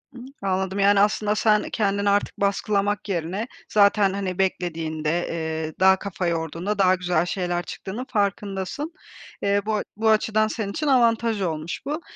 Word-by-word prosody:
Iıı, 245 Hz, 0 st, -9 dB, 0.2 s
anladım 190 Hz, 0 st, -1 dB
yani 200 Hz, 0 st, +5 dB
aslında 210 Hz, 0 st, +2 dB
sen 210 Hz, 0 st, +2 dB
kendini 200 Hz, -1 st, 0 dB
artık 205 Hz, 0 st, +1 dB
baskılamak 200 Hz, +1 st, 0 dB
yerine 185 Hz, +6 st, -2 dB, 0.2 s
zaten 200 Hz, -1 st, +4 dB
hani 195 Hz, -2 st, -3 dB
beklediğinde, 165 Hz, -3 st, -1 dB
eee, 160 Hz, -1 st, -3 dB
daha 190 Hz, +1 st, +6 dB
kafa 185 Hz, -2 st, -3 dB
yorduğunda 170 Hz, +4 st, -2 dB
daha 185 Hz, -1 st, +5 dB
güzel 175 Hz, -2 st, 0 dB
şeyler 175 Hz, -1 st, -2 dB
çıktığının 215 Hz, +9 st, -6 dB
farkındasın. 200 Hz, -, -2 dB, 0.5 s
Eee, 200 Hz, 0 st, +2 dB
bu 215 Hz, 0 st, 0 dB
a 210 Hz, -, -1 dB
bu 220 Hz, 0 st, +2 dB
açıdan 215 Hz, 0 st, +3 dB
senin 215 Hz, -3 st, -3 dB
için 300 Hz, +7 st, -3 dB
avantaj 230 Hz, -4 st, +3 dB
olmuş 160 Hz, -2 st, -3 dB
bu. 300 Hz, +4 st, -3 dB
200 Hz, 155 wpm, -24 LUFS, 180-210 Hz, 0.5 s, daha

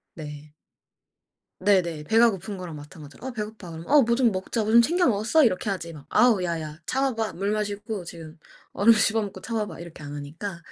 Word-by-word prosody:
네. 150 Hz, -1 st, -9 dB, 1.1 s
네네. 180 Hz, -6 st, +2 dB
배가 230 Hz, +7 st, +5 dB
고픈 195 Hz, +1 st, -6 dB
거랑 180 Hz, -3 st, -7 dB
마찬가지로 150 Hz, -, -12 dB
"어 -, -, -3 dB
배고파." 210 Hz, -6 st, -6 dB
그러면 165 Hz, +1 st, -9 dB
"어 290 Hz, 0 st, +6 dB
뭐 235 Hz, 0 st, +2 dB
좀 240 Hz, -3 st, +3 dB
먹자, 195 Hz, +4 st, -2 dB
뭐 215 Hz, -, -1 dB
좀 235 Hz, +1 st, +8 dB
챙겨 350 Hz, +8 st, +2 dB
먹었어?" 235 Hz, +7 st, +3 dB
이렇게 205 Hz, -2 st, +1 dB
하지 170 Hz, -3 st, -4 dB
막 145 Hz, -3 st, -12 dB
"아우 230 Hz, -7 st, +4 dB
야야 160 Hz, -3 st, -3 dB
참아 270 Hz, -1 st, 0 dB
봐, 225 Hz, -1 st, -2 dB
물 200 Hz, +3 st, -1 dB
마시고 210 Hz, -2 st, -3 dB
지금 165 Hz, -1 st, -10 dB, 0.4 s
얼음 225 Hz, +4 st, +5 dB
씹어 220 Hz, +1 st, +2 dB
먹고 195 Hz, -2 st, -6 dB
참아 225 Hz, -1 st, -2 dB
봐." -, -, -9 dB
이렇게 170 Hz, -2 st, -10 dB
안 145 Hz, 0 st, -7 dB
하니까 165 Hz, +6 st, -6 dB
200 Hz, 380 characters per minute, -25 LUFS, 165-225 Hz, 1.1 s, 좀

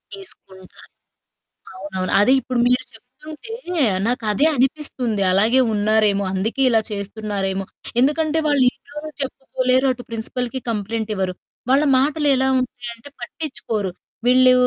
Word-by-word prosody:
తీసుకుంటారు. 190 Hz, -, -12 dB, 0.9 s
అవునవును. 190 Hz, -1 st, -4 dB
అదే 250 Hz, +6 st, +5 dB
ఇప్పుడు 255 Hz, -1 st, -3 dB
మీరు 250 Hz, +1 st, +2 dB
చెప్తుంటే 300 Hz, -, -12 dB, 0.5 s
నాకదే 230 Hz, +3 st, +1 dB
అనిపిస్తుంది. 255 Hz, -5 st, 0 dB
అలాగే 220 Hz, +7 st, +4 dB
ఉన్నారేమో, 210 Hz, -1 st, +2 dB
అందుకే 225 Hz, +8 st, -1 dB
ఇలా 225 Hz, -, +4 dB
చేస్తున్నారేమో. 200 Hz, -1 st, -3 dB, 0.4 s
ఎందుకంటే 305 Hz, +4 st, +2 dB
వాళ్ళు 285 Hz, -3 st, +3 dB
ఇంట్లో 290 Hz, +1 st, -11 dB, 0.2 s
చెప్పుకోలేరు, 260 Hz, -1 st, 0 dB
అటు 245 Hz, -1 st, -10 dB
ప్రిన్సిపల్‌కి 245 Hz, +3 st, -3 dB
కంప్లెయింట్ 220 Hz, +1 st, -3 dB
ఇవ్వరు. 185 Hz, -1 st, -1 dB, 0.4 s
వాళ్ళ 280 Hz, +3 st, +4 dB
మాటలేలా 280 Hz, -2 st, +2 dB
ఉంటాయి 245 Hz, -1 st, -5 dB
అంటే 235 Hz, +4 st, -13 dB
పట్టించుకోరు. 235 Hz, -, -4 dB, 0.4 s
వీళ్ళు 255 Hz, 0 st, +6 dB
245 Hz, 110 wpm, -21 LUFS, 210-265 Hz, 0.9 s, వీళ్ళు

